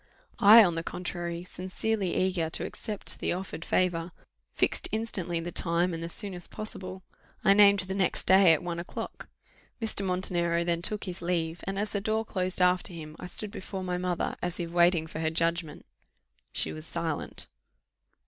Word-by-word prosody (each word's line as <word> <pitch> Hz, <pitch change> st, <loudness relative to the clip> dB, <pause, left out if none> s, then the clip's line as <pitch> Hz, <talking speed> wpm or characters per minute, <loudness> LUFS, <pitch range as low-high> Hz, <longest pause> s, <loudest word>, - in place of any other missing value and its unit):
I, 220 Hz, +2 st, +10 dB
on 175 Hz, -4 st, +2 dB
the 165 Hz, -, -2 dB
contrary, 175 Hz, 0 st, -4 dB
sincerely 185 Hz, +2 st, -2 dB
eager 185 Hz, -3 st, +1 dB
to -, -, +1 dB
accept 210 Hz, -3 st, -4 dB
the -, -, 0 dB
offered 180 Hz, -2 st, -5 dB
favour, 175 Hz, -2 st, 0 dB, 0.4 s
fixed -, -, +1 dB
instantly 190 Hz, -6 st, -2 dB
the 170 Hz, +1 st, -5 dB
time, 170 Hz, +1 st, +1 dB
and 165 Hz, -, -4 dB
the 165 Hz, -, -4 dB
soonest 180 Hz, -1 st, -4 dB
possible. 185 Hz, -3 st, -7 dB, 0.4 s
I 195 Hz, -, +7 dB
named 200 Hz, -1 st, +6 dB
the 185 Hz, +1 st, -3 dB
next 190 Hz, -2 st, +1 dB
day 190 Hz, -2 st, +7 dB
at 160 Hz, -, +2 dB
one 170 Hz, -1 st, -3 dB
o'clock. 175 Hz, -, -7 dB, 0.5 s
Mr. 220 Hz, -3 st, +1 dB
Montenero 175 Hz, -2 st, +1 dB
then 170 Hz, -1 st, 0 dB
took 210 Hz, +4 st, -2 dB
his 180 Hz, -2 st, -6 dB
leave, 170 Hz, -1 st, -1 dB
and 195 Hz, +1 st, -3 dB
as 205 Hz, +1 st, -1 dB
the 200 Hz, -, -1 dB
door 220 Hz, +2 st, 0 dB
closed 185 Hz, -2 st, -1 dB
after 180 Hz, +1 st, +2 dB
him, 155 Hz, -2 st, -8 dB
I -, -, -6 dB
stood 205 Hz, +3 st, 0 dB
before 190 Hz, -2 st, -6 dB
my 180 Hz, -1 st, -2 dB
mother, 180 Hz, -1 st, -1 dB
as 175 Hz, 0 st, -3 dB
if 170 Hz, -1 st, -3 dB
waiting 170 Hz, -1 st, +4 dB
for 160 Hz, 0 st, -2 dB
judgment; 165 Hz, -1 st, -1 dB, 0.7 s
she 80 Hz, -, 0 dB
was 80 Hz, 0 st, -8 dB
silent. -, -, -4 dB
180 Hz, 175 wpm, -29 LUFS, 170-195 Hz, 0.7 s, I